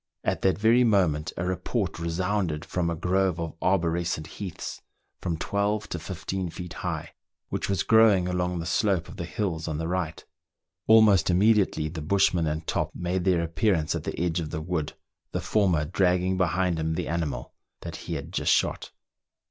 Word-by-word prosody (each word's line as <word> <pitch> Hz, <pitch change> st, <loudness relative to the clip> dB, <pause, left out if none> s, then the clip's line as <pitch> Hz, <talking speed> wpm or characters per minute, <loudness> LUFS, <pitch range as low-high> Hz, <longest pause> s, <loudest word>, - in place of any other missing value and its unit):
At -, -, -1 dB
that 95 Hz, -, +2 dB
very 115 Hz, +4 st, +4 dB
moment 90 Hz, -9 st, +2 dB
a 90 Hz, -, -2 dB
report 90 Hz, -1 st, -2 dB
resounded 85 Hz, -1 st, -1 dB
from 90 Hz, -2 st, -1 dB
a 85 Hz, -, -1 dB
grove 90 Hz, +1 st, +1 dB
of 85 Hz, -1 st, -3 dB
arborescent 85 Hz, -3 st, 0 dB
heaths, 90 Hz, +2 st, -7 dB, 0.4 s
from 85 Hz, -2 st, -2 dB
twelve 105 Hz, +4 st, -1 dB
to 90 Hz, -, -3 dB
fifteen 95 Hz, +2 st, -4 dB
feet 90 Hz, 0 st, -7 dB
high, -, -, -3 dB, 0.4 s
which -, -, -3 dB
was 100 Hz, -1 st, +1 dB
growing 110 Hz, -5 st, +5 dB
along 90 Hz, 0 st, -1 dB
the 85 Hz, -, -4 dB
slope 90 Hz, -1 st, +1 dB
of -, -, -11 dB
the 85 Hz, -, -4 dB
hills 90 Hz, -5 st, -3 dB
on 80 Hz, -2 st, -2 dB
the 80 Hz, +1 st, -2 dB
right. 90 Hz, -3 st, -3 dB, 0.6 s
Almost 110 Hz, -6 st, +6 dB
immediately 95 Hz, -4 st, +3 dB
the 80 Hz, 0 st, -6 dB
bushman 90 Hz, 0 st, +2 dB
and 80 Hz, +1 st, -2 dB
Top -, -, -2 dB
made 90 Hz, +1 st, -2 dB
their 90 Hz, -3 st, +3 dB
appearance 80 Hz, 0 st, +1 dB
at -, -, -3 dB
the -, -, -4 dB
edge 85 Hz, 0 st, 0 dB
of 80 Hz, -2 st, -4 dB
the 80 Hz, -, -3 dB
wood, 80 Hz, -2 st, -3 dB, 0.4 s
the -, -, 0 dB
former 90 Hz, -8 st, +2 dB
dragging 90 Hz, +2 st, +1 dB
behind 90 Hz, -1 st, +1 dB
him 80 Hz, 0 st, -1 dB
the -, -, -2 dB
animal 80 Hz, -7 st, -3 dB, 0.3 s
that -, -, -6 dB
he 85 Hz, -, -5 dB
had 80 Hz, +4 st, -6 dB
just -, -, +1 dB
shot. -, -, +1 dB
90 Hz, 180 wpm, -26 LUFS, 80-95 Hz, 0.6 s, Almost